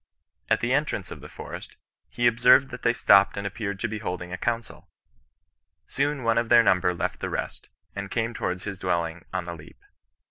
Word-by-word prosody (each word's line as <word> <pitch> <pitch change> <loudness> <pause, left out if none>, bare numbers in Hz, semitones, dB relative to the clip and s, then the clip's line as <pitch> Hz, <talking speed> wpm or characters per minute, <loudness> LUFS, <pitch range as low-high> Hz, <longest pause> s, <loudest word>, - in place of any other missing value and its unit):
At - - +2
the 120 +2 +1
entrance 140 -9 -1
of - - -8
the - - -11
forest, - - -9 0.3
he 120 - -2
observed 125 +3 +5
that - - -7
thej 120 0 +2
stopped 100 -5 +5
and 100 - -3
appeared 100 -1 -4
to 115 - 0
be 110 -1 -5
holding 90 -2 -5
a - - -1
council. 115 -1 -3 1.0
Soon 140 -1 -1
one 115 0 +3
of 115 -1 -2
their 120 -1 +7
number 90 -3 +3
left 85 - -3
the - - -3
rest, - - -5 0.3
and 100 -1 -5
came 115 +2 -1
towards 90 -4 -3
his 100 -2 -6
dwelling 85 -2 -2
on 95 -1 -2
the 85 0 -6
leap. 80 0 -13
105 Hz, 200 wpm, -26 LUFS, 90-120 Hz, 1.0 s, their